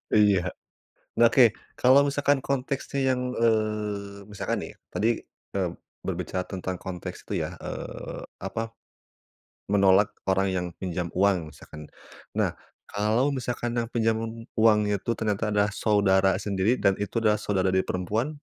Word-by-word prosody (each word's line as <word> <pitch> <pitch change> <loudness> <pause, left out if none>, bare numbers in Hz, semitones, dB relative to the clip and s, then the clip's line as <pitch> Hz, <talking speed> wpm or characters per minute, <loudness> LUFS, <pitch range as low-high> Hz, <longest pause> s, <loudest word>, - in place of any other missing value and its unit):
Iya. 105 -3 +5 0.8
Oke, 120 0 +7 0.2
kalau 135 +3 +5
misalkan 145 0 +2
konteksnya 140 0 -2
yang, 125 -1 +1
eee, 105 -3 0
misalkan 105 - -2
nih, - - -7 0.2
tadi, 110 - +1 0.4
mmm, 90 -3 -1 0.3
berbicara 90 0 -2
tentang 95 -1 -4
konteks 90 -2 -7
tuh, - - -4
ya. - - -5
Eee, - - -6 0.2
apa, 115 +4 -4 1.0
menolak 100 0 +5 0.2
orang 95 0 +2
yang 90 0 -1
pinjam 90 -2 -3
uang, 90 -5 +1
misalkan. 75 +1 -11 0.5
Nah, - - 0 0.3
kalau 110 +7 +1
misalkan 120 -1 -3
yang 115 -1 0
pinjam 115 -1 +2 0.4
uang 110 -1 +5
itu 100 +2 -1
ternyata 105 0 0
adalah 105 0 +3
saudara 100 -2 +3
sendiri, 100 +4 +1
dan 100 -1 +3
itu 105 +3 -2
adalah 105 -1 +3
saudara 95 -2 0
dari 95 0 +2
perempuan 105 +8 -1
105 Hz, 135 wpm, -26 LUFS, 95-115 Hz, 1.0 s, Oke